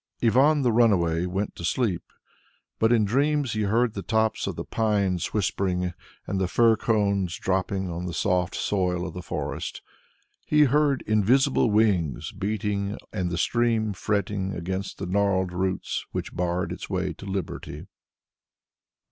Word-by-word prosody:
Ivan 140 +6 +4
the 120 - +3
Runaway 90 -7 +3
went 95 +3 -3
to - - -7
sleep, 90 -1 0 0.8
but 110 +1 +3
in 115 -3 +4
dreams 140 +3 +1
he 110 - -1
heard 115 +3 +2
the 100 - -4
tops 110 +1 0
of - - -3
the - - -5
pines 100 -5 0
whispering, 90 -3 -1 0.3
and 95 -1 -2
the 95 - +1
fir 115 +4 +4
cones 100 -5 0
dropping 95 0 -1
on 85 +1 -4
the 90 - -4
soft 90 -1 0
soil 90 -3 0
of - - -6
the 90 - -6
forest; - - -5 0.6
he 150 0 +4
heard 145 0 +2
invisible 120 +5 +3
wings 100 - +1
beating 105 0 -2 0.2
and 90 -4 -1
the 85 - -3
stream 115 +1 +1
fretting 100 0 -1
against 95 +3 -4
the 100 - -4
gnarled 95 -1 +1
roots 95 +1 -2
which - - -4
barred 90 0 -1
its - - -6
way - - -1
to - - -12
liberty. 95 -3 -5
100 Hz, 150 wpm, -26 LUFS, 90-110 Hz, 0.8 s, Ivan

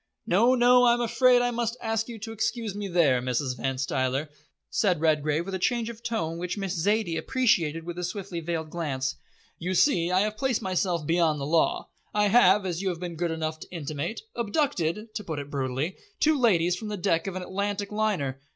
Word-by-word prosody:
"No, 230 +8 +4
no, 245 0 +6
I'm 240 0 +4
afraid 245 +1 +4
I 245 - +1
must 235 0 -2
ask 225 0 -1
you 235 - -6
to 225 - -5
excuse 225 -1 -2
me 205 0 -4
there, 160 -9 +3
Mrs. 125 +1 -1
Van 130 +2 -2
Stuyler," 130 +2 -1 0.4
said 185 -6 +2
Redgrave, 155 0 +1
with 195 - -6
a 190 - -2
change 235 +3 0
of 230 -1 -13
tone 170 -9 -2
which 180 +3 -3
Miss 195 -2 -2
Zaidie 195 -1 +1
appreciated 170 - +1
with 175 +1 -6
a - - -3
swiftly 190 -2 -4
veiled 160 -1 -4
glance. 140 -6 -2 0.4
"You 180 +3 -2
see, 175 - +3
I 185 +1 +3
have 215 +1 -1
placed 260 -3 0
myself 180 -3 0
beyond 165 -2 +2
the 140 - -3
law. 160 +3 +1 0.3
I 210 -1 +3
have, 200 -3 +5
as 175 -1 -2
you 195 - 0
have 175 -2 -4
been 175 -1 -5
good 170 +1 -1
enough 160 -1 -3
to - - -11
intimate, 160 +3 -4
abducted 215 - -1
to 210 - -4
put 160 -5 -5
it 145 0 -6
brutally 135 +5 -2 0.2
two 310 0 +4
ladies 180 - +3
from 215 +4 -7
the 210 -1 -3
deck 165 -1 0
of 190 - -4
an 185 - -4
Atlantic 200 +2 -3
liner. 195 -12 -1
180 Hz, 205 wpm, -27 LUFS, 160-220 Hz, 0.4 s, no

